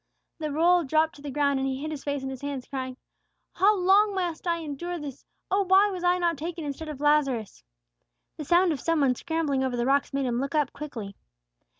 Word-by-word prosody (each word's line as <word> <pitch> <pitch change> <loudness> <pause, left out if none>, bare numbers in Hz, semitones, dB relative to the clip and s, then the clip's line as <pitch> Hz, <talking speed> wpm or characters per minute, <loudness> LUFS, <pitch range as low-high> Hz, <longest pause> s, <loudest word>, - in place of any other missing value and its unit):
The 305 -2 -3
roll 340 +4 +4
dropped 315 +2 +2
to - - -14
the 290 - -6
ground, 280 0 +1
and 265 - 0
he 265 0 -2
hid 310 +2 -4
his 295 -3 -6
face 285 -2 -2
in 265 - -3
his 265 - -8
hands, 280 -3 -4
crying, 260 -2 -5 0.6
"How 410 +2 +4
long 390 +3 +4
must 350 -2 -3
I 340 -1 +2
endure 335 +3 -5
this? 285 -4 -8 0.2
Oh, 395 +1 +3
why 385 +2 +5
was 365 -2 -5
I 355 0 +3
not 340 -4 0
taken 330 0 -5
instead 295 +2 -5
of 295 -3 -7
Lazarus?" 275 - +1 0.7
The 305 - -5
sound 350 +3 +4
of 295 - -2
some 330 -2 +1
one 265 -2 +4
scrambling 290 -1 -1
over 255 -2 -1
the 240 - 0
rocks 275 +1 +2
made 275 -1 -1
him 240 -1 0
look 275 +2 -3
up 295 -3 +1
quickly. 225 -10 -7
295 Hz, 225 wpm, -27 LUFS, 270-345 Hz, 0.7 s, why